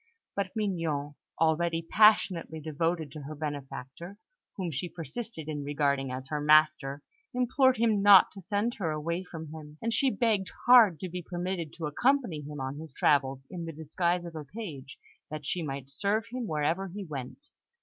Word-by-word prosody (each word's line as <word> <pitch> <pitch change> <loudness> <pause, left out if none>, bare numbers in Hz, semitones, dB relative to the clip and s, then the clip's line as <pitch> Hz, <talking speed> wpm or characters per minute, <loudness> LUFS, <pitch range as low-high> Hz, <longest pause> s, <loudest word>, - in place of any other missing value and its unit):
But 200 -1 -1
Mignon, 165 -9 -1 0.3
already 165 +1 +2
passionately 185 -4 +4
devoted 160 0 -2
to 150 - -8
her 150 +2 -7
benefactor, 145 +4 -6 0.4
whom 180 -4 -2
she 165 +5 -3
persisted 165 - -6
in 150 -2 -3
regarding 140 -2 0
as 130 +1 -6
her 150 -1 -2
master, 150 -2 +4 0.3
implored 255 +1 +3
him 220 -3 +2
not 200 -2 +8
to 195 - -11
send 205 +5 -1
her 170 -5 0
away 165 +4 -2
from 160 -4 -8
him; 150 -1 -10
and 230 0 -1
she 270 - +3
begged 210 -4 +1 0.2
hard 230 -9 +7
to 185 - -3
be 180 +1 -5
permitted 175 -2 -4
to 165 - -5
accompany 235 - +1
him 150 0 -7
on 135 +2 -4
his 160 -3 -9
travels 135 -2 +2
in 175 -3 -5
the 165 - -5
disguise 170 +3 -1
of 170 - -7
a 155 - -5
page, 145 - -8 0.3
that 150 -1 -6
she 175 +5 -1
might 135 -3 -5
serve 205 +8 0
him 250 -2 -3
wherever 160 +5 0
he 195 +2 -7
went. 150 - -8
165 Hz, 175 wpm, -29 LUFS, 150-195 Hz, 0.4 s, not